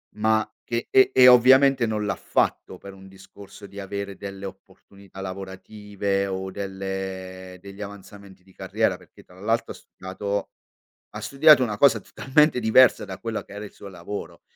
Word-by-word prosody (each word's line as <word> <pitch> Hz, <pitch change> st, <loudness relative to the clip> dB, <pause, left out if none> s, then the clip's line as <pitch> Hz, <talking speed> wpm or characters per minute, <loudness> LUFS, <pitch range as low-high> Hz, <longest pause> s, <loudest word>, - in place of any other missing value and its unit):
ma 110 Hz, 0 st, +1 dB, 0.2 s
che 120 Hz, 0 st, -4 dB
e 130 Hz, -, +5 dB
e 125 Hz, -1 st, +7 dB
ovviamente 130 Hz, +1 st, +6 dB
non 105 Hz, -1 st, -2 dB
l'ha 100 Hz, -, -1 dB
fatto -, -, -2 dB
per 100 Hz, -1 st, -12 dB
un 95 Hz, 0 st, -15 dB
discorso 95 Hz, +1 st, -14 dB
di 100 Hz, +1 st, -11 dB
avere 100 Hz, 0 st, -6 dB
delle 100 Hz, 0 st, -8 dB
opportunità 95 Hz, 0 st, -13 dB
lavorative 100 Hz, +1 st, -4 dB
o 95 Hz, 0 st, -5 dB
delle 95 Hz, -1 st, -6 dB
degli 100 Hz, +2 st, -12 dB
avanzamenti 100 Hz, -1 st, -11 dB
di 95 Hz, -, -22 dB
carriera, -, -, -1 dB
perché -, -, -19 dB
tra -, -, -19 dB
l'altro -, -, -1 dB
ha -, -, -15 dB
studiato 100 Hz, +2 st, -5 dB, 0.7 s
ha -, -, -6 dB
studiato 145 Hz, 0 st, +5 dB
una 110 Hz, -5 st, -1 dB
cosa 115 Hz, -3 st, +4 dB
totalmente 135 Hz, +6 st, +1 dB
diversa 120 Hz, +2 st, +4 dB
da -, -, -8 dB
quella 115 Hz, -1 st, -4 dB
che -, -, -14 dB
era 105 Hz, +1 st, -7 dB
il 100 Hz, -, -12 dB
suo 100 Hz, -, -13 dB
lavoro, 95 Hz, +2 st, -8 dB
100 Hz, 165 wpm, -24 LUFS, 95-110 Hz, 0.7 s, e